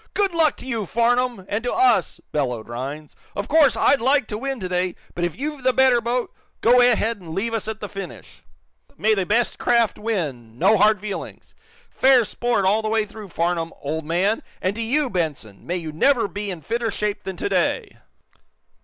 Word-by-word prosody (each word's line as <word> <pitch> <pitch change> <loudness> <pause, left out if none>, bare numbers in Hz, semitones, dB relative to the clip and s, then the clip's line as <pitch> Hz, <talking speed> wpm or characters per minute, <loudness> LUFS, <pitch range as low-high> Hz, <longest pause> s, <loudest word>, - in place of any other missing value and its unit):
"Good 400 -3 +1
luck 320 -3 +2
to - - -9
you, 230 -7 -3
Farnum 240 -2 +1
and 210 +3 -2
to 245 - -1
us!" 385 +1 +2
bellowed 125 -6 -2
Rhinds. 140 +6 -6 0.2
"Of 205 +1 -3
course, 285 -7 +4
I'd 275 -1 +3
like 270 +2 +3
to 210 - -3
win 270 0 -3
today, 180 -1 -1 0.2
but 175 - -3
if 175 -2 -2
you've 295 +1 -4
the 255 0 +2
better 260 -2 +4
boat, 240 +1 -2 0.3
go 245 +2 +6
ahead 230 -2 +3
and 165 -4 -9
leave 230 +4 -1
us 225 -1 -2
at 220 0 -5
the 210 - -4
finish. 195 -3 -9 0.6
May 220 +1 +3
the 195 -4 -1
best 230 +3 +1
craft 235 -2 +2
win, 145 - -3
no 195 - +4
hard 210 +1 +4
feelings! 205 -1 -7 0.4
Fair 260 -3 +5
sport 240 -2 0
all 205 +4 +3
the 215 - -2
way 220 -1 +1
through, 210 0 -10
Farnum, 170 -1 -1
old 155 +2 -4
and 195 +6 +1 0.3
to 230 - -5
you, 275 +6 +1
Benson 155 - -4
may 175 +2 -1
you 160 -3 -5
never 235 - +2
be 205 +2 -5
in 175 -4 -5
fitter 230 +6 -2
shape 210 0 -2
than 190 -1 -6
to - - -2
day!" 440 0 0
215 Hz, 195 wpm, -22 LUFS, 180-245 Hz, 0.6 s, go